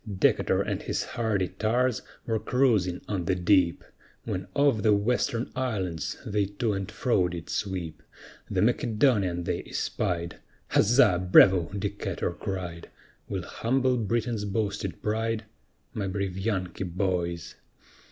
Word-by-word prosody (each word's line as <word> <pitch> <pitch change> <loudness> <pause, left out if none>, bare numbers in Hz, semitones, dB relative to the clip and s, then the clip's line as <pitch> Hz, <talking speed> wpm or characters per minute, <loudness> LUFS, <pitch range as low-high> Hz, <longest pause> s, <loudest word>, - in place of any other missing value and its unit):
Decatur - - +3
and - - -3
his - - -2
hardy 110 -7 -1
tars 115 +5 0 0.2
were 110 -1 0
cruising 105 -10 +2
on 95 -4 -2
the 95 - +1
deep, 90 -1 +3 0.4
When 95 - -3
off 140 -6 +3
the 105 0 +4
Western 115 +2 0
Islands 95 - -2
they 105 -1 +1
to 105 +2 -1
and 95 -1 -3
fro 105 -8 +1
did 85 -2 -6
sweep, 90 -6 -3 0.5
The - - +1
Macedonian 105 -7 +2
they - - -2
espied, 85 -1 -2 0.3
"Huzza! 105 -5 +5
bravo!" 90 -4 +7
Decatur 100 +1 -2
cried, 90 -3 -5 0.4
"We'll - - -3
humble 130 +2 +1
Britain's 115 0 -1
boasted 100 -3 -2
pride, 110 +1 -1 0.5
My 100 -2 -2
brave 95 -1 -2
Yankee 95 -3 -2
boys." 85 -2 -2
100 Hz, 125 wpm, -27 LUFS, 90-115 Hz, 0.5 s, bravo